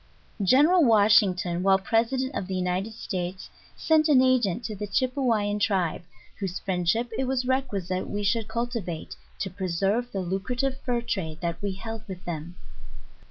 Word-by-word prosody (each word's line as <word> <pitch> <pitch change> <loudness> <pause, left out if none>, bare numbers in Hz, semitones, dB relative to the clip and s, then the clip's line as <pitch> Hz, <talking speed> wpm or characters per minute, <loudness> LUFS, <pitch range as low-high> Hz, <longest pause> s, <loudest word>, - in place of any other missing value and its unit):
GENERAL 295 - +5
WASHINGTON, 200 -6 +4
while 190 0 +5
President 235 +7 0
of 190 - -3
the 190 - -3
United 185 +4 -1
States 185 -4 -5 0.3
sent 315 -1 +3
an 280 -4 +6
agent 245 -5 +2
to 215 - -4
the 210 +1 -5
Chypewyan 225 -3 0
Tribe, 190 -5 0 0.4
whose 190 -3 -3
friend 180 -3 -1
ship 230 +5 +1
it 265 - +1
was 255 -1 -1
requisite 200 -9 -1
we 205 0 -3
should 215 +2 +1
cultivate, 230 -9 -4 0.2
to 190 - -3
preserve 195 +6 -1
the 195 - -2
lu 185 +2 -1
crative 255 +6 -2
fur 245 -3 -1
trade 165 -9 -3
that 170 -1 -3
we 200 -1 -2
held 225 +3 -6
with 185 -2 -8
them. 170 0 -5
205 Hz, 160 wpm, -26 LUFS, 185-245 Hz, 0.4 s, an